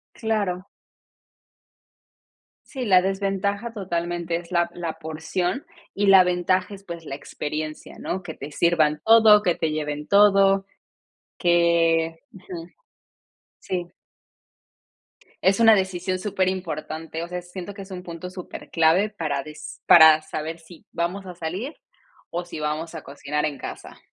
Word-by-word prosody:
Claro. 205 Hz, -5 st, -1 dB, 2.0 s
Sí, 260 Hz, -3 st, -5 dB
la 185 Hz, -4 st, +6 dB
desventaja, 200 Hz, +3 st, -1 dB
totalmente, 175 Hz, -4 st, -2 dB
es 170 Hz, 0 st, -10 dB
la 175 Hz, -1 st, +2 dB
la 170 Hz, -2 st, -4 dB
porción, 165 Hz, -, -3 dB, 0.3 s
y 205 Hz, 0 st, 0 dB
la 195 Hz, -1 st, +8 dB
ventaja 180 Hz, +2 st, 0 dB
es, 195 Hz, 0 st, -11 dB
pues, 170 Hz, -2 st, -7 dB
la 135 Hz, -, -6 dB
experiencia, 155 Hz, +2 st, -6 dB
¿no? 185 Hz, +1 st, -4 dB
Que 165 Hz, -3 st, -6 dB
te 140 Hz, +2 st, -8 dB
sirvan 155 Hz, -1 st, +2 dB
todo, 220 Hz, -2 st, +7 dB
que 180 Hz, -, +3 dB
te 160 Hz, -2 st, -1 dB
lleven 150 Hz, -1 st, -3 dB
todo, 195 Hz, -1 st, +5 dB, 0.7 s
que 165 Hz, -2 st, +2 dB
ujú. 180 Hz, -3 st, -9 dB, 0.9 s
Sí. 175 Hz, -1 st, -4 dB, 1.5 s
Es 195 Hz, +2 st, +3 dB
una 225 Hz, -1 st, +7 dB
decisión 185 Hz, -1 st, -1 dB
superimportante, 180 Hz, -5 st, -3 dB
o 170 Hz, -, -4 dB
sea, 180 Hz, 0 st, -5 dB
siento 180 Hz, +2 st, -8 dB
que 200 Hz, -, -9 dB
es 195 Hz, 0 st, -11 dB
un 180 Hz, -1 st, -6 dB
punto 175 Hz, 0 st, -7 dB
superclave 180 Hz, 0 st, 0 dB
para 155 Hz, -9 st, -3 dB
des 155 Hz, +1 st, -10 dB
para 160 Hz, -2 st, +8 dB
saber 155 Hz, +1 st, -5 dB
si 165 Hz, 0 st, -16 dB
vamos 180 Hz, +4 st, -2 dB
a 180 Hz, -1 st, -8 dB
salir, 180 Hz, -, -5 dB, 0.6 s
o 175 Hz, +1 st, -3 dB
si 165 Hz, -3 st, -7 dB
vamos 155 Hz, +2 st, -3 dB
a 160 Hz, -, -6 dB
cocinar 145 Hz, +1 st, -3 dB
en 150 Hz, -2 st, -2 dB
casa. -, -, -9 dB
175 Hz, 135 wpm, -24 LUFS, 160-195 Hz, 2.0 s, la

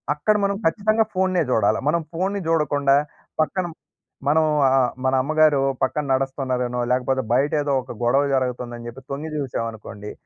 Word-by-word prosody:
అక్కడ 150 Hz, +9 st, +1 dB
మనం 200 Hz, 0 st, 0 dB
ఖచ్చితంగా 215 Hz, +6 st, +2 dB
ఫోన్‌నే 185 Hz, -2 st, +2 dB
జూడాల. 110 Hz, -2 st, +3 dB
మనం 170 Hz, +2 st, +1 dB
ఫోన్‌ని 190 Hz, +4 st, -1 dB
జూడకుండా 145 Hz, -4 st, +2 dB, 0.5 s
పక్కన 185 Hz, +4 st, 0 dB, 0.6 s
మనం 155 Hz, +2 st, +4 dB, 0.2 s
ఆహ్, 130 Hz, -2 st, +3 dB
మన 130 Hz, -, +2 dB
అమ్మగారు 155 Hz, 0 st, +3 dB, 0.2 s
పక్కన 140 Hz, +3 st, 0 dB
నడుస్తున్నారనో 130 Hz, -2 st, -1 dB
లేకపోతే, 130 Hz, +1 st, +1 dB
బయట 135 Hz, +4 st, +2 dB
ఏదో 145 Hz, -1 st, -1 dB
ఒక 125 Hz, -, -9 dB
గొడవ 135 Hz, +4 st, +3 dB
జరుగుతుందని 125 Hz, -2 st, -3 dB
చెప్పి 125 Hz, +3 st, -11 dB
తొంగి 150 Hz, +3 st, -4 dB
చూసామనుకోండి. 110 Hz, -5 st, -5 dB
135 Hz, 140 wpm, -22 LUFS, 125-160 Hz, 0.6 s, మనం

